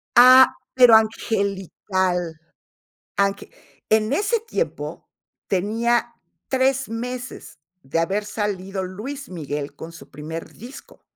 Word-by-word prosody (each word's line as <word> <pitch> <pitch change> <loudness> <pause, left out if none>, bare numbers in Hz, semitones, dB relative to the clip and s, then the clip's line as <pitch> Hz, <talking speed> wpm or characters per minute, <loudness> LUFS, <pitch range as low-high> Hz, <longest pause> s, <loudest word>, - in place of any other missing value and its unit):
Ah, 255 +2 +8 0.2
pero 245 -3 +8
angelical, 190 -5 0 0.8
ange 200 0 0 0.4
en 220 +3 +2
ese 420 +8 +1
tiempo, 465 +2 -4 0.4
tenía 230 +5 0 0.3
3 265 -1 +1
meses 245 - -6 0.2
de 135 +5 -1
haber 195 +5 0
salido 195 -2 -3
Luis 245 +10 -7
Miguel 145 -4 -5
con 165 - -9
su 165 - -14
primer 155 +3 -7
disco, 250 +6 -12
210 Hz, 100 wpm, -22 LUFS, 180-250 Hz, 0.8 s, Ah